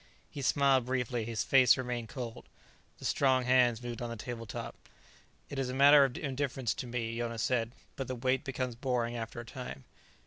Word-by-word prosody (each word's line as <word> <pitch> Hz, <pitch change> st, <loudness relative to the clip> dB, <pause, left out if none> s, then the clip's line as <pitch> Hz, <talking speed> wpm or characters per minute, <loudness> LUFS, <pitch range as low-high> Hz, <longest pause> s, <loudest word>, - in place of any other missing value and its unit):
He 140 Hz, -, -6 dB
smiled 135 Hz, -2 st, +3 dB
briefly; 125 Hz, -3 st, -1 dB
his 115 Hz, -1 st, -2 dB
face 130 Hz, -2 st, +6 dB
remained 120 Hz, -3 st, -3 dB
cold. 120 Hz, -3 st, -7 dB, 0.5 s
The -, -, -10 dB
strong 130 Hz, -2 st, +3 dB
hands 125 Hz, -2 st, +3 dB
moved 120 Hz, -1 st, -5 dB
on 120 Hz, -, -3 dB
the 115 Hz, -, -4 dB
tabletop. 115 Hz, -1 st, -6 dB, 0.7 s
"It 140 Hz, -, -5 dB
is 130 Hz, -2 st, -1 dB
a 130 Hz, -, -3 dB
matter 140 Hz, +1 st, +8 dB
of 135 Hz, -2 st, 0 dB
indifference 135 Hz, -4 st, -2 dB
to 125 Hz, -, -6 dB
me," 115 Hz, -1 st, -3 dB
Jonas 115 Hz, -2 st, -2 dB
said. 115 Hz, -2 st, 0 dB, 0.2 s
"But 135 Hz, -, -4 dB
the 130 Hz, -, -3 dB
wait 130 Hz, +2 st, 0 dB
becomes 130 Hz, -3 st, -3 dB
boring, 120 Hz, -1 st, -1 dB
after 115 Hz, 0 st, -5 dB
a 120 Hz, -, -7 dB
time." 115 Hz, -, -8 dB
125 Hz, 185 wpm, -31 LUFS, 115-130 Hz, 0.7 s, matter